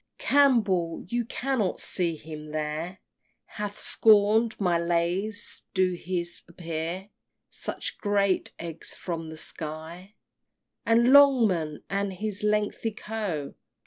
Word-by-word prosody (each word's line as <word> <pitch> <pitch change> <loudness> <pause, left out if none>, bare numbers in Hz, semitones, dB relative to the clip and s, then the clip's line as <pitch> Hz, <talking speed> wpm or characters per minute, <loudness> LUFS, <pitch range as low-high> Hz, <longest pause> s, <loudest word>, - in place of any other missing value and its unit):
XXVI. - - -18
Campbell 210 -12 +3
(you 240 +1 0
cannot 245 -5 -1
see 170 -3 0
him 155 -1 -9
here) 155 +4 -3 0.5
Hath 210 -1 -6
scorn'd 220 +1 +4
my 175 -4 +2
lays: 175 +5 -1
do 185 -1 +3
his 175 0 -3
appear 170 +2 -5 0.4
Such - - -5
great 200 -2 +1
eggs 165 -1 -4
from 165 -3 -5
the 160 - -8
sky? 160 +6 -6 0.7
And 235 +3 +5
Longman, 220 - +5
and 200 0 -1
his 205 +1 -3
lengthy 210 +1 0
Co. 210 -9 -4
185 Hz, 115 wpm, -27 LUFS, 170-215 Hz, 0.7 s, And